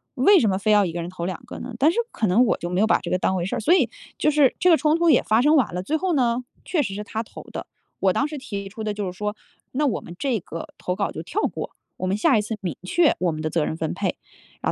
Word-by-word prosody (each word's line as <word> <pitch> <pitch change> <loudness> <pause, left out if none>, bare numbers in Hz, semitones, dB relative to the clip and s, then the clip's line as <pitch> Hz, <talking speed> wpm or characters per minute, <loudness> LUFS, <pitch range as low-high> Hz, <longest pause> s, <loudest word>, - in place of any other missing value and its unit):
为 375 +10 +6
什 230 - +2
么 190 - +1
非 215 +2 +1
要 205 -1 +5
一 170 - -4
个 170 - -3
人 170 - -5
投 180 -2 -5
2 185 0 -4
个 - - -8
呢？ 250 - -7
但 300 +4 +5
是 - - -6
可 220 - 0
能 215 +8 +4
我 - - +2
就 175 - -5
没 180 +1 -1
有 215 - +4
把 - - +4
这 175 - -6
个 185 - +3
当 190 +1 0
回 175 -2 -1
事 190 - -2
儿， - - -2
所 270 +11 +3
以 290 -11 +3 0.3
就 - - +3
是 290 -3 +4
这 365 - +4
个 330 - +7
冲 305 0 +2
突 340 0 +3
也 280 - +6
发 220 +2 +3
生 300 +4 +5
完 250 -10 +1
了， 180 - -2
最 310 +11 0
后 370 +2 0
呢， 245 -3 +1 0.2
确 335 - 0
实 195 -5 -4
是 210 +2 -4
他 220 +2 -4
投 - - -11
的。 - - -5 0.3
我 190 -2 +3
当 280 - +1
时 300 0 -6
提 200 -7 -5
出 220 +2 -7
的 210 -1 -1
就 205 -1 -3
是 180 -1 -5
说 210 +1 -2 0.4
那 295 +3 +1
我 265 - 0
们 170 - -10
这 255 -2 0
个 165 -2 -7
投 180 - -2
稿 200 +1 -1
就 160 - -6
跳 385 - -3
过， - - -3 0.3
我 185 - -3
们 190 +2 0
下 215 - +4
一 - - +2
次 215 +1 -4
明 175 -7 -3
确 320 - +3
我 180 -2 +1
们 155 0 -5
的 155 - 0
责 165 -1 +1
任 160 - -3
分 160 -1 -2
配， - - -2 0.4
然 - - 0
215 Hz, 335 characters per minute, -23 LUFS, 185-275 Hz, 0.4 s, 个